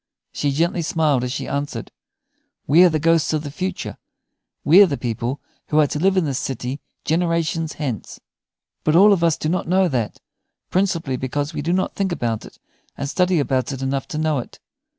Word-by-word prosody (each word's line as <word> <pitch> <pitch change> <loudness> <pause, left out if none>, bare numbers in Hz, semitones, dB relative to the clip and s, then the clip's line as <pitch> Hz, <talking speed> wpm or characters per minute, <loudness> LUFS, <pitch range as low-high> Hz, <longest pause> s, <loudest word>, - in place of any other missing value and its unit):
She 145 - 0
gently 170 +5 +1
smiled 155 -5 +1
as 125 - -2
she - - -4
answered, 140 -5 -4 0.7
"We 160 +6 +6
are 180 - +7
the 160 - 0
ghosts 165 0 +2
of 155 -1 -1
the 145 - -6
future. 185 +5 -4 0.7
We 175 +6 +7
are 200 - +8
the 140 -5 -2
people 120 +3 -3 0.3
who 155 - +2
are 150 - +6
to 150 - -3
live 190 +3 +2
in 180 - +3
this 135 -3 -1
city 130 +1 -4 0.3
generations 165 -1 0
hence. 130 - -5 0.6
But 155 - +2
all 200 +4 +7
of 175 -4 0
us 165 -2 +3
do - - -3
not 180 +1 -1
know 185 +2 +3
that, 120 -7 -2 0.5
principally 170 -8 0
because 145 +5 -3
we 150 - -3
do 165 +4 -1
not 185 +1 0
think 195 -2 -1
about 115 -9 -2
it - - -14 0.4
and 140 - -3
study 180 +3 +2
about 130 -2 0
it 135 -1 -5
enough 135 0 -2
to 165 -4 -5
know 155 -2 +1
it. 120 - -9
155 Hz, 200 wpm, -21 LUFS, 135-170 Hz, 0.7 s, are